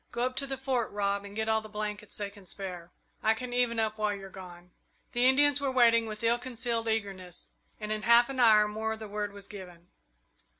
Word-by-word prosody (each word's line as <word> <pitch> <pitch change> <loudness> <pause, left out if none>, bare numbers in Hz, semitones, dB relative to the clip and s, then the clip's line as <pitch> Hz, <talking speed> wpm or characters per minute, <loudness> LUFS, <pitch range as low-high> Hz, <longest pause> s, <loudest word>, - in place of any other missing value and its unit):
Go 240 +1 0
up 255 0 -2
to 275 - -1
the 270 0 -3
Fort, 260 -3 -1
Rob, 200 0 -1
and 200 0 -10
get 220 0 -1
all 220 0 +2
the 215 - -11
blankets 210 0 -5
they 205 -1 -4
can 200 -2 -16
spare 180 -3 -6 0.3
I 220 +1 +3
can 245 +2 -6
even 245 -2 +2
up 215 -1 -1
while 210 -1 +1
you're 195 -1 -9
gone." 180 -2 -11 0.4
The 245 +1 +3
Indians 285 +1 +5
were 280 - +1
waiting 230 -3 +4
with 215 +1 -7
ill 235 +1 +3
concealed 235 -2 -2
eagerness, 195 -5 -3 0.3
and 210 -1 -5
in 215 0 -1
half 235 +2 +6
an 270 -1 -5
hour 215 -3 +6
more 220 +1 -3
the 220 -1 -7
word 205 0 -3
was 200 -1 -11
given. 180 -4 -11
220 Hz, 220 wpm, -30 LUFS, 200-240 Hz, 0.4 s, half